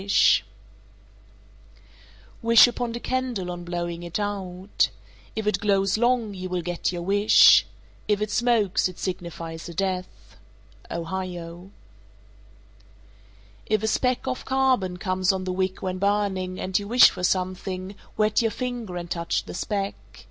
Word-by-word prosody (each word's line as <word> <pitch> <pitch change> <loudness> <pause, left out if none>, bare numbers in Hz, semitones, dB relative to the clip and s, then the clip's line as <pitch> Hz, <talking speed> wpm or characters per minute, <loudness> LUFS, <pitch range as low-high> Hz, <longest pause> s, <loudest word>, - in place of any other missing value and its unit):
Wish 230 0 +8
upon 240 -1 -3
a - - -4
candle 245 -9 -2
on 175 0 -7
blowing 175 -1 -4
it 175 +3 -4
out. 195 -2 -1 0.5
If 220 -1 -3
it 210 - +1
glows 195 -2 +2
long, 235 -2 +1
you 185 -1 -6
will 180 -1 -2
get 175 +1 -2
your 175 -1 -5
wish. 205 +3 +6 0.4
If 210 -1 +2
it 210 0 -2
smokes, 220 -6 +2
it 185 - -12
signifies 170 -2 -5
a 170 - -9
death. 185 0 -4 0.5
Ohio. 175 0 -5 2.0
434. - - +2
If 215 - -2
a - - +1
speck 250 +3 0
of 260 -1 -3
carbon 260 -9 +1
comes 185 0 +1
on 190 -1 -3
the 185 0 -3
wick 185 0 -2
when 185 -1 -3
burning, 195 -2 0
and 185 +1 0
you 200 - -7
wish 245 +3 +7
for 180 - -8
something, 185 +1 -2 0.2
wet 215 +1 +2
your 225 - +1
finger 240 -5 -5
and 175 0 -5
touch 170 -1 -1
the - - -9
speck. 200 +1 -2
190 Hz, 145 wpm, -25 LUFS, 180-215 Hz, 2.0 s, Wish